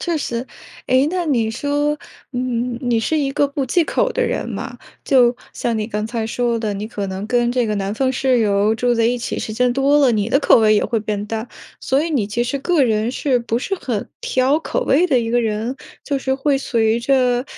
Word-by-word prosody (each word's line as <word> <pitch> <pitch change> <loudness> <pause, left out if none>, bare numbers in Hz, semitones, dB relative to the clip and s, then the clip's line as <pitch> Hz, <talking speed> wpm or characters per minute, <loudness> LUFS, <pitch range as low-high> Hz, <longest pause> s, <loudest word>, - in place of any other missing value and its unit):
确 345 -2 -1
实。 245 -4 -3 0.4
诶， 260 +2 +3
那 360 -1 -2
你 235 -7 +1
说， 290 +5 -1 0.3
嗯， 245 -1 -2
你 240 -3 +1
是 310 +7 0
一 275 -2 -1
个 285 0 +2
不 280 -1 -3
忌 345 +7 +2
口 - - 0
的 - - 0
人 475 - -2
嘛， - - -6 0.3
就 245 -3 +4 0.2
像 235 -2 -2
你 215 -1 -2
刚 210 -1 -2
才 225 -1 -3
说 235 +1 0
的， 220 -2 -2
你 200 +1 -4
可 205 -3 -4
能 190 +2 -5
跟 240 +1 +1
这 245 -1 +1
个 215 - -1
南 195 0 -2
方 260 +4 0
室 260 -1 +2
友 205 -1 +2
住 245 +1 +1
在 230 -1 +2
一 245 +2 +1
起 240 - -4
时 215 - -4
间 250 +2 +1
多 275 +3 +3
了， 270 -5 +4
你 210 0 0
的 270 - +3
口 275 - +5
味 215 -1 +4
也 - - +2
会 225 - -1
变 210 -1 -3
淡， 225 +2 -4 0.3
所 270 +2 +1
以 330 - -3
你 255 -10 0
其 235 +3 -1
实 280 +3 -2
个 320 -1 +2
人 220 -1 +1
是 260 0 0
不 235 0 -1
是 390 +10 -2
很 240 - -4
挑 260 +3 +1
口 - - -2
味 315 - +3
的 265 -7 +3
一 230 -1 -2
个 240 +1 +2
人？ 225 +3 -2 0.3
就 280 - -1
是 265 0 -1
会 275 +1 +1
随 230 -3 +1
着 250 -1 +2
245 Hz, 250 characters per minute, -19 LUFS, 225-275 Hz, 0.4 s, 口